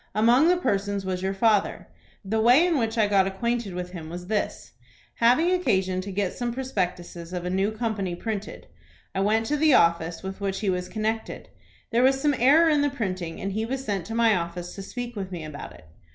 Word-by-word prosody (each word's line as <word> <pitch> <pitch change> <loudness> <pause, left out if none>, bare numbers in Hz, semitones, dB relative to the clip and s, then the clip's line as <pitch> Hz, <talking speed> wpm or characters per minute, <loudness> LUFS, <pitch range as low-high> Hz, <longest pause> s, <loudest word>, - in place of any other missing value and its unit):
Among 240 +8 +5
the 360 +1 +4
persons 200 - -1
was 185 -1 -2
your 190 +1 -2
father. 210 0 +1 0.4
The 220 +3 0
way 250 +9 +6
in 335 -5 +1
which 225 -1 -1
I 220 - +4
got 195 -2 +3
acquainted 225 0 -2
with 180 0 -5
him 165 -3 -8
was 175 +1 -7
this: 210 +2 -3 0.5
Having 250 +10 +4
occasion 190 - +1
to 200 +1 -7
get 195 -1 -1
some 240 -1 -3
prospectuses 180 -8 -4
of 180 -1 -4
a 180 - -2
new 195 +2 +1
company 215 -5 -3
printed, 210 +2 -5 0.5
I 190 - -2
went 215 +3 +2
to 295 +5 0
the 305 -2 +5
office 170 -1 +2
with 190 +1 -6
which 195 0 -2
he 200 -3 +1
was 180 0 -3
connected. 220 +1 -3 0.4
There 235 +1 +3
was 265 +1 +4
some 295 +1 +2
error 295 +7 +6
in 300 -2 +3
the 290 - +2
printing, 185 -10 -4
and 195 - -3
he 215 +3 -2
was 265 +3 -4
sent 195 -5 -2
to 225 - -5
my 230 -2 +4
office 175 0 -4
to 195 - -7
speak 240 +4 -6
with 195 -2 -5
me 175 -3 -5
about 150 -2 -8
it. 75 - -16
205 Hz, 215 wpm, -25 LUFS, 185-240 Hz, 0.5 s, way